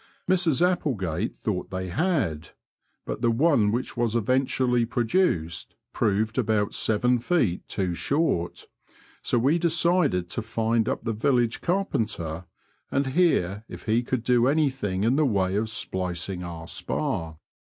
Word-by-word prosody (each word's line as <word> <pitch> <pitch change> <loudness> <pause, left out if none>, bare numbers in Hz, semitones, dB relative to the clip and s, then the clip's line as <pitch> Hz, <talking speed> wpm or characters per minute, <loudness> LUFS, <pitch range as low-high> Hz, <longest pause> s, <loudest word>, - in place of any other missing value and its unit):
Mrs 175 -3 +3
Applegate 110 - -2
thought 100 -5 -3
they 95 -1 -4
had; 90 - -1 0.5
but - - -5
the 120 - +3
one 115 -4 +3
which 120 +4 -3
was 120 -2 0
eventually 125 +1 +1
produced 115 - 0 0.2
proved 110 +3 0
about 105 -3 +1
seven 125 +3 +2
feet 120 - 0
too 95 -3 -1
short, 115 - -1 0.6
so - - 0
we 140 +8 +3
decided 170 - +2
to - - -3
find 115 0 0
up - - -3
the 115 - -1
village 120 +1 +1
carpenter 110 - -1 0.4
and 140 +1 0
hear 105 - +2
if - - -10
he 110 +2 +2
could 125 -1 -2
do 125 0 +3
anything 130 -10 0
in 120 +5 +2
the 155 - +4
way 95 -4 +1
of 110 +2 0
splicing 90 -3 -3
our 85 -1 -7
spar. 80 -1 -3
115 Hz, 140 wpm, -26 LUFS, 95-135 Hz, 0.6 s, the